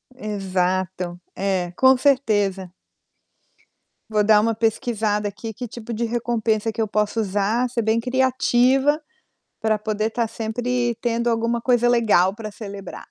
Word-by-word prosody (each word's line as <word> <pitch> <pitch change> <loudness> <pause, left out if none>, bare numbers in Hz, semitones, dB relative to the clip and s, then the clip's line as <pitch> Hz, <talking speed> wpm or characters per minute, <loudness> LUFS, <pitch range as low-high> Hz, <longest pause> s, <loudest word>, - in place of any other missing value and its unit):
Exato. 185 -4 -2 0.2
É, 185 -3 -1
com 260 +3 +5
certeza. 205 -9 +1 1.4
Vou 210 -1 +2
dar 210 0 +6
uma 225 +1 +1
pesquisada 220 -2 0
aqui 220 +2 -7
que 245 +3 -6
tipo 235 +1 -8
de 235 +2 -1
recompensa 225 -2 -1
que 225 - -3
eu 220 - 0
posso 210 +2 0
usar, 210 +4 0
ser 235 -1 -1
bem 220 +1 +1
criativa 260 +3 +2 0.6
pra 215 -1 +1
poder 215 +1 -2
tá 230 0 -1
sempre 240 +2 -2
tendo 235 0 0
alguma 230 +1 0
coisa 240 0 +2
legal 210 -6 +3
pra 215 -2 -7
celebrar. 200 -3 -9
220 Hz, 135 wpm, -22 LUFS, 205-240 Hz, 1.4 s, dar